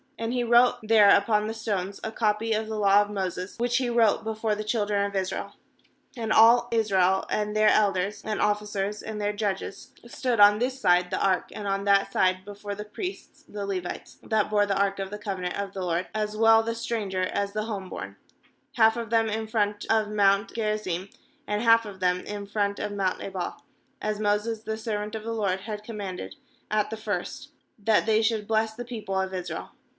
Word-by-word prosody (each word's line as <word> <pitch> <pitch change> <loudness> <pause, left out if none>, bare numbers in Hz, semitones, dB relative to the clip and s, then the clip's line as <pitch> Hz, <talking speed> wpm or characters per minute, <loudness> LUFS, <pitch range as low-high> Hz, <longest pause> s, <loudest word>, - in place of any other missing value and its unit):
32And 230 +1 -3
he 245 -1 0
wrote 240 +1 +5
there 215 -2 +6
upon 210 +1 +2
the 220 - -3
stones 200 -3 -3
a 220 - -3
copy 220 0 0
of 215 0 -1
the 220 0 -4
law 200 -1 +5
of 205 - -2
Moses, 185 -2 -4
which 240 0 +1
he 255 -2 0
wrote 230 -2 +3
before 220 0 -1
the 210 +1 -3
children 210 -2 0
of 200 0 -5
Israel. 190 -1 -3 0.6
^And 225 -3 -3
all 235 +2 +6
Israel, 190 -4 +2
and 210 0 -1
then: 215 0 +5
elders 200 -1 +1
and 215 -1 -3
officers, 210 0 -1
and 215 -1 -6
their 205 0 -1
judges, 200 -2 -4
stood 240 -1 -1
on 205 0 +8
this 255 +2 -1
side 180 -3 +3
the - - -2
ark 190 -2 +1
and 205 - -6
on 195 0 -1
that 200 0 +3
side 185 0 +2
before 205 0 -7
the 210 +1 -7
priests 370 - -7
the 205 -1 -5
Levites, 185 -3 -5
that 220 -2 +1
bore 205 -1 +3
the 195 -1 0
ark 200 0 +1
of 195 -1 -3
the 210 - -6
covenant 190 -4 -4
of 200 -1 -4
the 190 - -4
LORD, 175 +1 -1
as 215 0 -2
well 225 0 +6
the 230 0 -3
stranger 215 -5 -2
as 200 +2 -2
the 215 - -1
home 200 -4 -5
born; - - -7 0.6
half 225 -1 +4
of 230 -2 -4
them 225 0 +2
in 220 +1 -3
front 205 -2 -1
of 220 -1 +3
mount 200 0 +2
Gerizim, 210 -4 -2 0.4
and 210 +2 -1
half 230 0 +5
of 200 -2 -9
them 180 0 +1
in 205 -1 -6
front 200 0 -1
of 210 - -3
mount 195 -2 -1
Ebal; 190 -3 -5 0.4
as 210 0 -2
Moses 215 +1 0
the 220 -1 -3
servant 210 -1 -4
of 220 - -5
the 230 +1 -3
LORD 195 -4 -1
had 210 0 -6
commanded 195 - -6 0.3
at 210 0 0
the 220 - -4
first, 215 +5 -4 0.3
that 210 +1 +2
they 220 0 +3
should 220 -2 0
bless 220 0 +1
the 245 +1 -6
people 215 -5 -3
of 190 0 -2
Israel. 175 -3 -5
210 Hz, 205 wpm, -26 LUFS, 195-220 Hz, 0.6 s, on